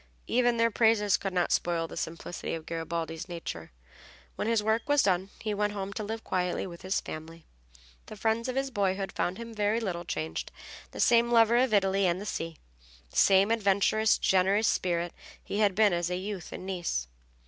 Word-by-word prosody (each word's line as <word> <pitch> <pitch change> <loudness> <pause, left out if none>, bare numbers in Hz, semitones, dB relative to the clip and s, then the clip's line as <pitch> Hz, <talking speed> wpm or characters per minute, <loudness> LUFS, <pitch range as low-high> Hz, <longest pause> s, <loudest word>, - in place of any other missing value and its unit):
Even 240 -1 +2
their 230 0 +3
praises 210 -2 +3
could 195 - -3
not 180 -1 0
spoil 170 -1 +1
the - - -10
simplicity 165 +1 -4
of 160 -1 -8
Garibaldi's 165 0 -4
nature. 165 - -6 0.6
When - - -2
his 225 -2 +2
work 220 +4 0
was 290 -1 +4
done 190 0 +1
he 215 -1 -2
went 205 0 0
home 200 -1 -4
to 215 - -4
live 220 +2 -5
quietly 180 -1 -1
with 170 -2 -9
his 190 +1 0
family. 160 +1 -9 0.6
The - - -8
friends 225 +3 0
of 255 - -3
his 270 0 -1
boyhood 195 -3 -1
found 180 +2 -2
him 230 0 -8
very 210 +1 +1
little 180 -6 -3
changed, 80 - -4 0.4
the - - -10
same 235 0 +4
lover 230 0 +5
of 255 -1 +3
Italy 195 -1 +3
and 175 +1 0
the 205 - -6
sea, 165 -5 -4 0.5
the - - -8
same 195 +2 +5
adventurous, 215 0 +3
generous 195 +3 +3
spirit 175 -1 0 0.3
he 205 - -3
had 205 -3 +3
been 210 -2 +4
as 175 0 0
a 180 - -1
youth 195 -2 -6
in - - -7
Nice. 175 - -2
195 Hz, 190 wpm, -29 LUFS, 175-220 Hz, 0.6 s, lover